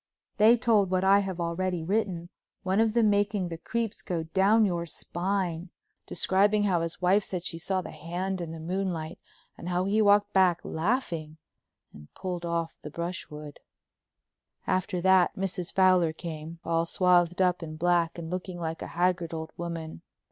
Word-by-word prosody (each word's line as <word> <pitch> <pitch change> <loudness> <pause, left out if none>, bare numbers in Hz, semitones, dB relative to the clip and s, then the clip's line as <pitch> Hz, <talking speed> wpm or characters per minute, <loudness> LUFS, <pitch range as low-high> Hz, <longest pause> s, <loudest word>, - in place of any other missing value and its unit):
They 225 +3 +6
told 220 -5 +3
what 185 0 +1
I 195 +1 +6
have 190 -3 -3
already 170 0 -1
written, 180 -2 -1 0.3
one 190 +2 +1
of 225 -1 +3
them 225 -3 +4
making 205 -2 0
the 165 - -5
creeps 230 +1 -3
go 170 -3 -3
down 195 +6 +3
your 170 -3 -1
spine, 175 0 -3 0.4
describing 205 +2 +2
how 185 -4 +2
his 165 +2 -5
wife 195 +3 +4
said 180 -3 -4
she 165 - -3
saw 185 +2 -1
the - - -8
hand 180 +3 -4
in 170 - -5
the 165 0 -7
moonlight, 170 -1 -3 0.4
and 175 - -6
how 180 0 +1
he 210 +3 +2
walked 205 0 +4
back, 185 -3 +4
laughing, 165 - -2 0.6
and 75 0 -14
pulled 180 -2 -4
off 170 -1 -2
the 150 - -7
brushwood. 150 -3 -6 1.1
After 185 0 -1
that 190 -1 +4
Mrs. 185 -2 -3
Fowler 185 -4 +4
came, 160 0 -7
all 165 0 +1
swathed 180 -1 +3
up 180 -1 +2
in 155 -2 -6
black 170 0 +1
and 165 -1 -6
looking 180 -1 -4
like 165 -1 -4
a - - -5
haggard 175 -2 +1
old 160 0 -6
woman. 165 -2 -6
180 Hz, 170 wpm, -28 LUFS, 165-195 Hz, 1.1 s, They